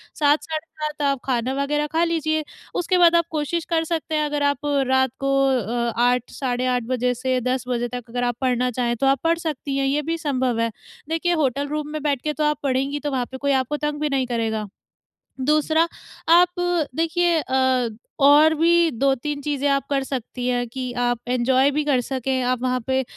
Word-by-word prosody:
7 295 0 +3
साढ़े 315 0 -4 0.2
7 300 0 -3
आप 275 -1 +1
खाना 255 0 0
वग़ैरह 295 +2 0
खा 320 +3 +1
लीजिए, 315 -2 0 0.3
उसके 355 +1 +1
बाद 340 -1 +6
आप 335 -1 +3
कोशिश 315 +2 -2
कर 330 -1 +1
सकते 320 -1 -2
हैं, 305 0 +1
अगर 295 -1 -1
आप 285 0 +1 0.3
रात 260 -1 +2
को 275 0 0 0.2
अ, 235 -2 0
8 245 0 +2
साढ़े 250 -2 -2
8 250 -1 +1
बजे 250 0 +1
से 255 +1 0
10 255 +1 -1
बजे 240 -1 -1
तक 245 -1 -7
अगर 245 +1 -2
आप 245 -1 0
पढ़ना 250 -1 +1
चाहें, 240 0 -1
तो 275 - 0
आप 270 0 +3
पढ़ 330 0 +2
सकती 295 -4 -3
हैं, 275 - +1
ये 285 +2 +1
भी 330 +3 -2
संभव 260 -7 -1
है। 230 0 0 0.4
देखिए 330 +2 0
होटल 275 +2 0
रूम 300 0 -3
में 310 0 -4
बैठ 285 -4 0
के 305 +2 -2
तो 305 - -2
आप 300 -1 +1
पढ़ेंगी, 275 +1 0
तो 290 0 -3
वहाँ 255 -2 -1
पे 260 - -6
कोई 280 +1 0
आपको 265 +2 0
तंग 295 0 -3
भी 300 - +1
नहीं 270 -2 0
करेगा। 225 -3 -2 0.7
दूसरा 305 +4 +2 0.4
आप 355 +1 +5 0.4
देखिए 330 +1 +2
अ, 260 -3 +1 0.3
और 295 +3 +7
भी 335 +1 +3
2-3 275 +4 0
चीज़ें 285 -1 -1
आप 275 -1 +1
कर 275 -1 +1
सकती 255 -2 -5
हैं 245 -1 0
कि 260 +3 -6 0.2
आप 245 -1 0
एन्जॉय 255 +2 +3
भी 300 - +2
कर 280 -4 +2
सकें। 260 +1 -2
आप 250 -1 0
वहाँ 255 0 0
पे 265 0 +2
अ, - - -4
275 Hz, 210 wpm, -22 LUFS, 250-305 Hz, 0.7 s, और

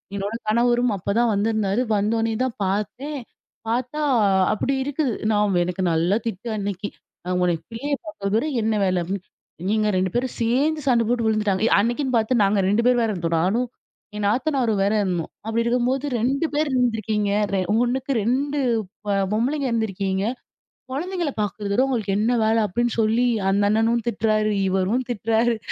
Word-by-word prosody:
என்னோட 200 +2 -3
கணவரும் 240 +2 +2
அப்ப 200 +2 -2
தான் 240 0 +3
வந்திருந்தாரு. 210 +1 +1
வந்தோனே 225 +2 +1
தான் 255 -3 -2
பாத்தேன். 230 +9 -3 0.5
பாத்தா 250 +6 -2 0.5
அப்பிடி 265 +6 -1
இருக்குது. 285 -2 -1 0.2
நான் 210 -1 +2
வ் - - +3
எனக்கு 180 +1 -3
நல்லா 170 +5 +2
திட்டு 225 +2 -4
அன்னக்கி. 205 0 -3 0.4
நான் 180 0 -1
உன்னைய 175 -2 +1
பிள்ளைய 245 +6 -4
பாக்கிறதோட 220 -5 -1 0.2
என்ன 220 0 +1
வேல? 185 -2 +1
அப்பிட்ன்னு 190 +2 -5 0.4
நீங்க 215 -1 +2
2 185 0 0
பேரும் 250 +1 -1
சேர்ந்து 280 +7 +1
சண்ட 240 -3 +4
போட்டு 240 -1 +1
விழுந்துட்டாங்க. 215 -1 +1
அன்னக்கின்னு 245 +4 0
பாத்து 225 +1 +2
நாங்க 200 +1 +2
2 210 +4 +2
பேரும் 250 -1 +4
வேற 225 - +1
இருந்தோம். 170 -3 -1
நானும் 225 +8 +1 0.5
என் 210 - -2
நாத்தனாரும் 240 -3 +1
வேற 200 +2 +2
இருந்தோம். 175 -4 -2 0.2
அப்பிடி 225 +1 0
இருக்கும்போது, 250 +3 +1
"2 270 +7 +1
பேர் 300 -1 +1
இருந்துருக்கீங்க! 220 -4 0 0.2
ரெ 195 - +2 0.2
1க்கு 260 +2 -1
2 280 +6 0 0.5
பா - - +1 0.2
பொம்பளைங்க 270 +6 0
இருந்துருக்கீங்க! 195 -4 -1 0.7
கொழந்தைங்கள 345 +3 -2
பாக்குறத 205 0 -4
விட 250 - +3
உங்களுக்கு 220 -7 -1
என்ன 220 +4 +2
வேல?" 220 +1 +3
அப்டின்னு 240 +4 -1
சொல்லி, 225 +3 +2 0.2
அந்த 200 +1 +2
அண்ணனும் 225 +2 +2
திட்றாரு. 215 -1 +1 0.2
இவரும் 195 +7 0
திட்டுறாரு. 230 +1 +1
225 Hz, 155 wpm, -23 LUFS, 200-245 Hz, 0.7 s, சண்ட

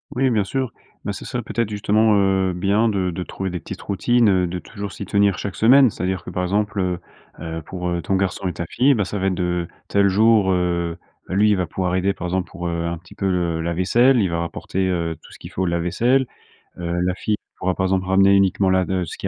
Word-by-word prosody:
Oui, 130 +1 +2
bien 110 -5 +1
sûr. 130 +2 -2 0.3
Bah 105 - -2
ce - - -8
serait 125 - -3
peut-être 115 0 -2
justement, 105 +1 +2
heu, 95 -2 +2
bien 100 +5 +2
de 95 -3 0
de 90 +2 -4
trouver 95 +1 -5
des 90 0 -4
petites - - -8
routines, 115 +4 +2
heu, 90 -2 +2
de 90 +1 -4
toujours 100 +3 -7
s'y 100 - -6
tenir 100 0 +2
chaque 100 - -5
semaine, 130 +3 +6
c'est-à-dire 90 -2 -3
que - - -8
par 90 - -2
exemple, 105 +2 -1 0.6
heu, 80 0 -5
pour, 90 -1 -4
heu, 85 0 -1
ton 95 - -1
garçon 95 0 -1
et 90 - -2
ta 85 - -4
fille, 135 +9 +3
bah, 110 -5 +1
ça 100 +1 -4
va 95 - 0
être 95 - +1
de 90 -1 -1 0.2
tel 100 0 +3
jour, 105 0 +4
heu, 85 -2 -1 0.3
lui 105 +3 +3
il - - +4
va 90 - 0
pouvoir 90 +1 -2
aider 95 +2 +1
par 90 - -7
exemple 90 -1 -2
pour, 90 -1 -5
heu, 85 0 -2
un 85 0 -2
petit 85 +2 -16
peu 95 - -1
le 85 -3 0
la 85 +1 -2
vaisselle, 120 +9 +3
il 95 - +1
va 85 0 -1
rapporter, 95 +2 -2
heu, 85 -3 -1
tout - - -16
ce - - -14
qu'il - - -10
faut 95 - -2
au - - +1
lave-vaisselle. 90 +10 +1 0.5
Heu, 85 0 -2
la 90 0 0
fille 105 +3 -1 0.2
pourra 95 0 -1
par 95 - 0
exemple 95 0 0
ramener 95 +1 +5
uniquement 95 0 +3
la 95 0 +3
de 95 -1 -1
ce 80 - -7
qu'il - - -4
95 Hz, 250 wpm, -21 LUFS, 90-100 Hz, 0.6 s, semaine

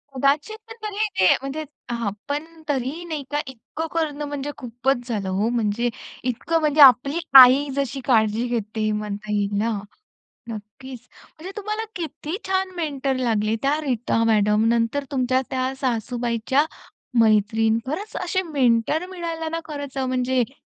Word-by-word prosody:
उदाचित 305 - 0
तरी 425 0 -1
ते, 185 - +6
म्हणजे 275 +3 -4 0.3
हां. 235 -4 -1 0.2
पण 290 +2 -1 0.2
तरीही 280 +4 -2
नाही 310 -4 -4
का 295 - 0
इतकं 265 +6 -6
करणं 300 -3 -1
म्हणजे 290 0 -4
खूपच 245 0 -2
झालं 205 -5 -2
हो. 200 +5 0
म्हणजे 235 0 0 0.3
इतकं 290 +7 0
म्हणजे 305 -1 +3
आपली 275 +4 +7 0.2
आई 265 +3 +8
जशी 275 -1 -2
काळजी 225 -1 +2
घेते 215 -2 -1
म्हणता 210 0 -4
येईल 205 0 0
ना? 230 +2 +1 0.8
नक्कीच. 230 +4 -8 0.4
म्हणजे 345 +5 -8
तुम्हाला 425 +1 -3
किती 325 0 -4
छान 380 0 0
मेंटर 280 -5 -1
लागले 220 -4 +1
त्या 290 +3 +1
रीता 245 -5 0
मॅडम, 210 -1 +3
नंतर 235 +5 0
तुमच्या 255 -1 +2
त्या 260 0 -1
सासूबाईच्या 240 +2 0 0.6
मैत्रीण. 220 +1 +3
खरंच, 385 +10 -4
असे 375 +2 0
मेंटर 280 0 +1
मिळायला 335 -3 -4
ना 330 +1 -3
खरंच 285 -3 -7
म्हणजे, 255 -1 +1
जे - - -21
260 Hz, 140 wpm, -23 LUFS, 230-300 Hz, 0.8 s, आई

